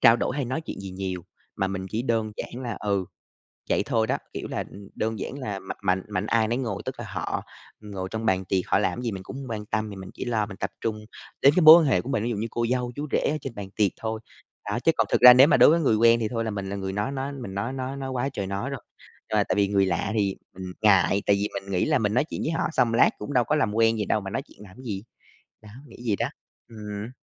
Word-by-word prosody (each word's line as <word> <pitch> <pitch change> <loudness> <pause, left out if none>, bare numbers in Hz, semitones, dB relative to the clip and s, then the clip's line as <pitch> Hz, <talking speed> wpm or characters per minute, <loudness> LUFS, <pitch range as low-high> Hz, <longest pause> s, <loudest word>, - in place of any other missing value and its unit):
trao 115 - +7
đổi 130 - -2
hay 140 - -1
nói 130 +6 -2
chuyện 160 - -7
gì 95 -1 -7
nhiều, 95 -1 -4 0.3
mà 95 - 0
mình 95 -1 -4
chỉ 110 +2 -1
đơn 115 -4 0
giản 125 +2 -6
là 120 -3 -4
ừ, 100 -2 0 0.7
vậy - - +2
thôi 115 -1 +1
đó, - - +1 0.2
kiểu - - -5
là, - - -3
ừm, 100 0 -11
đơn 110 -1 -2
giản 140 - -5
là 105 -7 -4
mạnh 95 - -7
mạnh 90 0 +1
mạnh 95 +2 -2
ai 110 -1 +2
nấy 120 +2 0
ngồi. 115 -7 -3
Tức 130 - -4
là 120 - -5
họ 90 -4 -3 0.4
ngồi 100 -3 -5
trong 110 0 -3
bàn 95 -3 +1
tiệc, 95 +1 0
họ - - +3
làm 115 - -1
gì 120 -2 -2
mình 95 -2 -6
cũng 115 - -9
hông 135 - -7
quan 105 -1 -4
tâm, 110 0 -2
thì 100 - -8
mình 95 -1 -9
chỉ - - -6
lo 115 -3 0
mình 100 -2 -10
tập - - -3
trung 110 -1 -1 0.4
đến 140 - +7
cái - - +6
mối 160 +1 +11
quan - - +1
hệ 135 - +3
của 125 - -8
mình, 135 -6 0
ví 120 - -1
dụ - - -1
như 110 - -2
cô 120 - 0
dâu, 125 -1 0
chú 145 +1 -4
rể - - +4
ở 155 - -1
trên 135 -4 -6
bàn 100 -2 -6
tiệc 105 -4 +3
thôi. 110 0 -2 0.5
Đó, - - -1
chứ - - +3
còn - - +2
thực - - +2
ra 125 0 +12
nếu 130 +3 +8
mà 150 - +4
đối - - +8
với 165 +2 +4
người 125 -7 +3
quen 115 +1 +5
thì 110 - +1
thôi 115 -1 -1
là - - -1
mình 100 -2 -4
là 100 - -3
người 95 -1 -4
nói 105 +5 -1
nói 135 +1 -3
mình 120 -8 -7
nói 105 +6 -2
nói 135 +1 -4
nói 135 -1 -4
quá 130 +1 -1
trời 100 -5 -3
nói 100 +7 -3
rồi, 135 - -4 0.5
ờ, - - +3
tại - - +2
vì 100 -1 +3
người 100 -1 +3
lạ 90 +3 -1
thì, 100 -2 +1 0.2
ừm, 90 -1 -7
ngại 100 -1 +4
tại 100 - +5
vì 100 +1 -1
mình 100 0 -5
nghĩ 90 - +1
là - - +3
mình 105 -1 0
nói 130 - +3
chuyện - - -4
với 160 - -1
họ 165 - 0
xong 115 -6 +2
lát - - +6
cũng 125 +7 -5
đâu 125 -3 +4
có 150 - +1
làm 110 -9 +1
quen 115 0 +3
gì 105 - -1
đâu 105 - +1
mà 95 - -6
nói - - -2
chuyện - - -20
làm 95 0 -14
gì, 105 -6 -5 0.6
đó, 105 - -13 0.2
nghĩ - - -13
vậy 105 -3 +2
đó, - - -1 0.4
ừm. 105 -1 -7
110 Hz, 295 wpm, -25 LUFS, 100-125 Hz, 0.7 s, ra